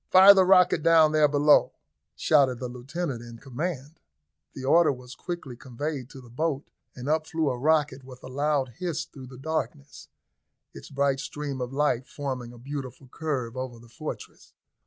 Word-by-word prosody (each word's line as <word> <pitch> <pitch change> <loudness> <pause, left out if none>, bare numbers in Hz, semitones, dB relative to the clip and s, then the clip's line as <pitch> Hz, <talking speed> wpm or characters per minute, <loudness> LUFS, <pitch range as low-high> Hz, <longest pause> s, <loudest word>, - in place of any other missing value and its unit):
Fire 190 +2 +9
the 190 -2 +4
rocket 180 -3 +5
down 160 -1 +5
there 155 -1 +4
below!" 145 +1 +4 0.4
shouted 140 -5 +3
the 125 - -4
lieutenant 130 +2 -5
in 120 -1 -10
command. 145 +3 -5 0.6
The 130 - -6
order 165 +3 +5
was 125 -1 -9
quickly 170 -8 -6
conveyed 130 +2 -5
to 135 - -11
the 120 - -15
boat, 145 +2 -2 0.3
and 125 +1 -7
up 155 +1 +1
flew 160 -4 0
a 125 - -4
rocket 145 -2 +1
with 125 -1 -13
a - - -8
loud 140 0 0
hiss 170 -3 -2
through 130 -3 -12
the 125 0 -12
darkness, 135 - -4 0.7
its - - -11
bright 140 -1 +1
stream 140 -1 -5
of 125 0 -4
light 135 -3 0
forming 130 -4 -5
a 120 - -13
beautiful 130 0 -7
curve 130 -6 -3
over 130 -2 -5
the 115 0 -16
fortress. 115 - -9
140 Hz, 175 wpm, -26 LUFS, 125-155 Hz, 0.7 s, Fire